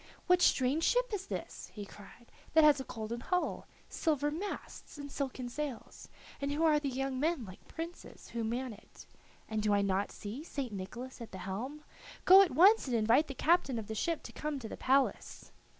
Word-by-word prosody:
"What 360 Hz, 0 st, +4 dB
strange 275 Hz, +3 st, +3 dB
ship -, -, +2 dB
is 390 Hz, -1 st, -3 dB
this," -, -, -6 dB
he 205 Hz, -2 st, -6 dB
cried, 205 Hz, +4 st, -15 dB, 0.2 s
"that 320 Hz, -, +8 dB
has 295 Hz, -2 st, +6 dB
a -, -, -3 dB
golden 225 Hz, +1 st, -5 dB
hull, 360 Hz, +8 st, -1 dB, 0.2 s
silver 295 Hz, -3 st, 0 dB
masts, 355 Hz, -1 st, -6 dB
and 285 Hz, -1 st, -7 dB
silken 265 Hz, -3 st, -3 dB
sails, 270 Hz, -1 st, -6 dB, 0.3 s
and 280 Hz, 0 st, -1 dB
who 300 Hz, +3 st, 0 dB
are 310 Hz, -2 st, +5 dB
the 285 Hz, -2 st, -2 dB
young 265 Hz, 0 st, -2 dB
men 310 Hz, -4 st, 0 dB
like 185 Hz, -1 st, -13 dB
princes 335 Hz, +2 st, -8 dB
who 235 Hz, -1 st, -3 dB
man 240 Hz, +2 st, -2 dB
it? 210 Hz, -, -15 dB, 0.4 s
And 220 Hz, -1 st, -2 dB
do 210 Hz, -1 st, +2 dB
I 200 Hz, -, +2 dB
not 195 Hz, 0 st, 0 dB
see 220 Hz, +8 st, -7 dB
St. 275 Hz, -8 st, -5 dB
Nicholas 240 Hz, +7 st, -7 dB
at 230 Hz, -, -8 dB
the 190 Hz, -, -7 dB
helm? 230 Hz, +11 st, -5 dB, 0.4 s
Go 380 Hz, +2 st, +10 dB
at 390 Hz, -, +4 dB
once 390 Hz, +3 st, +6 dB
and 250 Hz, -, 0 dB
invite 230 Hz, +7 st, +4 dB
the 275 Hz, -, -6 dB
captain 310 Hz, -6 st, +2 dB
of 220 Hz, -, -4 dB
the 220 Hz, -, -5 dB
ship 325 Hz, +9 st, -1 dB
to -, -, -9 dB
come 300 Hz, -1 st, -3 dB
to 240 Hz, -4 st, -6 dB
the -, -, -6 dB
palace." 270 Hz, +1 st, 0 dB
270 Hz, 200 wpm, -32 LUFS, 225-310 Hz, 0.4 s, Go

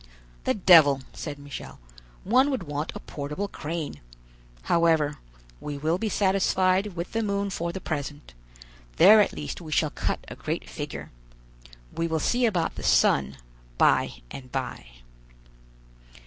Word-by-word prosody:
"The -, -, +1 dB
devil!" 160 Hz, -8 st, +6 dB
said 145 Hz, -2 st, -6 dB
Michel; 145 Hz, -1 st, -9 dB, 0.4 s
"one 255 Hz, +8 st, +4 dB
would 260 Hz, -9 st, -2 dB
want 145 Hz, 0 st, -4 dB
a -, -, -5 dB
portable 150 Hz, +7 st, -5 dB
crane. 160 Hz, -, -5 dB, 0.6 s
However, 160 Hz, -, +2 dB, 0.4 s
we 145 Hz, -1 st, -5 dB
will 160 Hz, +5 st, 0 dB
be 220 Hz, -, -1 dB
satisfied 190 Hz, -1 st, +1 dB
with 170 Hz, +1 st, -5 dB
the 225 Hz, -, -1 dB
moon 200 Hz, -1 st, -1 dB
for 170 Hz, -1 st, -3 dB
the 190 Hz, -, -6 dB
present; 145 Hz, -, -5 dB, 0.6 s
there 210 Hz, +5 st, +8 dB
at -, -, +1 dB
least 75 Hz, -, -6 dB
we 160 Hz, -2 st, -9 dB
shall 155 Hz, -1 st, +1 dB
cut -, -, -3 dB
a -, -, -8 dB
great -, -, -4 dB
figure. -, -, -7 dB, 0.8 s
We 165 Hz, -, -1 dB
will 160 Hz, -1 st, -1 dB
see 245 Hz, +9 st, +2 dB
about 175 Hz, -7 st, -1 dB
the -, -, -5 dB
sun 70 Hz, 0 st, +3 dB, 0.4 s
by -, -, +2 dB
and 130 Hz, -2 st, -9 dB
by." 130 Hz, -, -4 dB
165 Hz, 145 wpm, -26 LUFS, 145-195 Hz, 0.8 s, there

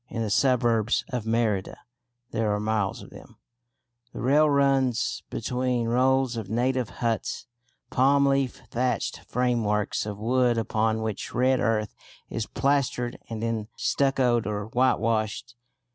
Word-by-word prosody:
In 115 Hz, -, -3 dB
the 105 Hz, -, -3 dB
suburbs 120 Hz, -2 st, +2 dB
of 120 Hz, -3 st, -4 dB
Merida 110 Hz, -4 st, 0 dB, 0.5 s
(there 110 Hz, -1 st, 0 dB
are -, -, -2 dB
miles 105 Hz, -2 st, -1 dB
of -, -, -14 dB
them) -, -, -14 dB, 0.8 s
the -, -, -7 dB
rail 150 Hz, +4 st, +4 dB
runs 135 Hz, -4 st, +1 dB
between 125 Hz, -2 st, -1 dB
rows 130 Hz, +1 st, +2 dB
of 110 Hz, -4 st, -5 dB
native 125 Hz, +1 st, 0 dB, 0.2 s
huts, 115 Hz, +2 st, -1 dB, 0.5 s
palm 140 Hz, +2 st, +4 dB
leaf 135 Hz, -2 st, 0 dB
thatched 125 Hz, +1 st, -1 dB
frameworks 110 Hz, -5 st, 0 dB
of 105 Hz, -1 st, -5 dB
wood 120 Hz, +2 st, +2 dB
upon 110 Hz, 0 st, 0 dB
which 110 Hz, -3 st, -4 dB
red 130 Hz, +1 st, +3 dB
earth 110 Hz, -3 st, 0 dB, 0.4 s
is 110 Hz, -, -3 dB
plastered 130 Hz, -2 st, 0 dB
and 115 Hz, -1 st, -5 dB
then 115 Hz, -2 st, -2 dB
stuccoed 130 Hz, -5 st, +1 dB
or 105 Hz, -1 st, -3 dB
whitewashed. 115 Hz, -2 st, 0 dB
120 Hz, 130 wpm, -26 LUFS, 110-130 Hz, 0.8 s, rail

